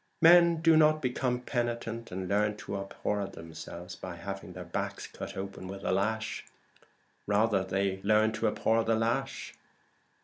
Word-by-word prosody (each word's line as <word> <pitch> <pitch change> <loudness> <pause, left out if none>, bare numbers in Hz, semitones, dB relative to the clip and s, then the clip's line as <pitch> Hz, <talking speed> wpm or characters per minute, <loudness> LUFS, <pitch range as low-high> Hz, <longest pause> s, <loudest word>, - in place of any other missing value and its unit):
Men 170 -1 +7
do 165 -1 +6
not 155 0 +5
become 125 -2 -1
penitent 120 -2 -3
and 95 +1 -4
learn 105 +2 +1
to 100 - -6
abhor 100 +1 -2
themselves 80 +2 -9
by 90 -2 -7
having 95 +2 -7
their - - -7
backs - - -3
cut - - -8
open 95 -1 -6
with 95 +1 -7
the - - 0
lash; 110 +4 -1 0.8
rather, 105 -1 +3
they 95 0 -1
learn 110 +2 +4
to 110 - 0
abhor 115 0 +2
the 115 0 +2
lash. 120 +5 -1
105 Hz, 150 wpm, -30 LUFS, 95-120 Hz, 0.8 s, Men